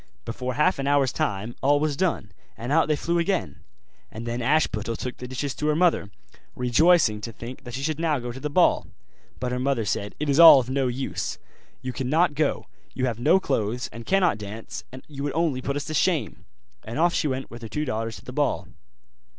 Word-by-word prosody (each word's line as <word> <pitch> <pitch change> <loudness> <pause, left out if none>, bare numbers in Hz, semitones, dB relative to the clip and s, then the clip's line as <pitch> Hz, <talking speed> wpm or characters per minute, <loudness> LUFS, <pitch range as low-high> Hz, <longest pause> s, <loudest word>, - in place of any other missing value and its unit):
Before 125 +2 -4
half 150 +3 +2
an 135 - -2
hour's 140 -3 +3
time 105 +4 -2
all 145 +2 +4
was 150 -1 0
done, 150 - -1 0.3
and 120 +3 -5
out 160 +2 +4
they 155 - +2
flew 170 +4 0
again. 185 +2 -1 0.5
And 115 +2 -7
then 120 +1 -3
Ashputtel 115 -5 +1
took 125 +1 -5
the 125 - -7
dishes 130 +2 -3
to 150 - -3
her 150 - +2
mother, 165 - +2 0.5
rejoicing 125 -3 +3
to 115 - -5
think 125 +5 -9
that 120 0 -6
she 135 - -4
should 155 0 -1
now 160 -3 +1
go 120 -1 -5
to 130 - -8
the 150 +2 -3
ball. 175 +5 +3 0.5
But 125 0 -2
her 125 - -1
mother 130 -4 0
said, 100 +1 -2
'It 150 - -2
is 140 +2 +2
all 165 -5 +11
of 130 0 -4
no 135 -1 +1
use, 130 +2 -3 0.5
you 130 0 -4
cannot 150 +5 +1
go; 150 0 0 0.3
you 130 - 0
have 120 -3 -2
no 180 +10 +4
clothes, 115 - -1
and 115 - -8
cannot 185 - +2
dance, 105 +2 -7
and 130 +1 -10
you 140 -2 -8
would 145 0 -2
only 160 -6 0
put 140 +2 -2
us 145 - -3
to 155 - -5
shame': 160 0 0 0.4
and 115 +4 -6
off 170 +2 +3
she 155 - +1
went 130 -1 -3
with 120 0 -9
her 115 - -7
two 150 +5 -2
daughters 115 -3 -3
to - - -13
the - - -8
ball. - - -1
135 Hz, 225 wpm, -25 LUFS, 120-155 Hz, 0.5 s, all